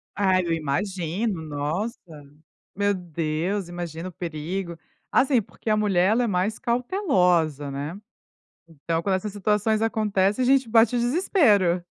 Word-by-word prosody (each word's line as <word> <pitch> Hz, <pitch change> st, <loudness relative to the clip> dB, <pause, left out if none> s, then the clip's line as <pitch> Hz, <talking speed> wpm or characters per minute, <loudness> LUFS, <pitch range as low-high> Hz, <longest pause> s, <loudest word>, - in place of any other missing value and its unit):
Ai, 190 Hz, -2 st, +2 dB
eu 165 Hz, -, 0 dB
imagino, 175 Hz, +5 st, -2 dB
nossa. 155 Hz, -, -3 dB, 0.8 s
Meu 205 Hz, +1 st, +1 dB
Deus, 170 Hz, +2 st, -3 dB
imagina 175 Hz, 0 st, -6 dB
o -, -, -12 dB
perigo. 170 Hz, +2 st, -5 dB, 0.3 s
Assim, 260 Hz, -3 st, +3 dB
porque 215 Hz, +2 st, -8 dB
a 215 Hz, -, +3 dB
mulher 195 Hz, -2 st, +2 dB
ela 240 Hz, +3 st, +2 dB
é -, -, 0 dB
mais 200 Hz, +2 st, 0 dB
cautelosa, 180 Hz, -, +1 dB
né? 145 Hz, +6 st, -5 dB, 0.7 s
Então 165 Hz, +1 st, -3 dB
quando 190 Hz, +1 st, +1 dB
essas 195 Hz, +2 st, -3 dB
situações 210 Hz, +2 st, 0 dB
acontecem 210 Hz, -1 st, +1 dB
a -, -, +1 dB
gente 265 Hz, -1 st, +3 dB
bate 225 Hz, +1 st, +4 dB
o 240 Hz, -, +1 dB
desespero. 235 Hz, -, +2 dB
190 Hz, 140 wpm, -24 LUFS, 170-220 Hz, 0.8 s, bate